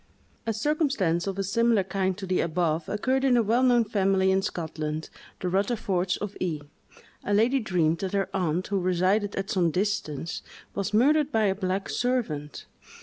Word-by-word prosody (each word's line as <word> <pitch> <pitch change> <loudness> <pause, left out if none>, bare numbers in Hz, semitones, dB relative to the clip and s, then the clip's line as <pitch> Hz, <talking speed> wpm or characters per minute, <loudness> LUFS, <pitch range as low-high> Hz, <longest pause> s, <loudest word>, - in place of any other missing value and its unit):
A - - +2
circumstance 220 - 0
of 195 0 -3
a 195 - 0
similar 225 +1 +2
kind 190 0 -1
to 200 - -5
the 185 -1 0
above 165 -1 -1
occurred 260 +6 0
in 255 -3 +4
a 235 - +4
well 230 +4 +2
known 245 -2 +4
family 195 -3 +2
in 190 0 +2
Scotland, 160 -4 -4 0.3
the 185 - -1
Rutherfords 190 -1 0
of 205 -1 -5
E——. 165 -5 -1 0.6
A 205 - +1
lady 240 +6 +3
dreamed 170 -7 +1
that 190 0 -3
her 195 -1 +1
aunt, 180 -1 0
who 200 -1 +1
resided 185 +3 +1
at 195 0 -3
some 175 -3 +2
distance, 170 -4 -2 0.3
was 200 +1 -2
murdered 290 +7 +3
by 225 -4 +2
a 195 - +3
black 190 0 -2
servant. 190 - -2
195 Hz, 175 wpm, -26 LUFS, 180-220 Hz, 0.6 s, in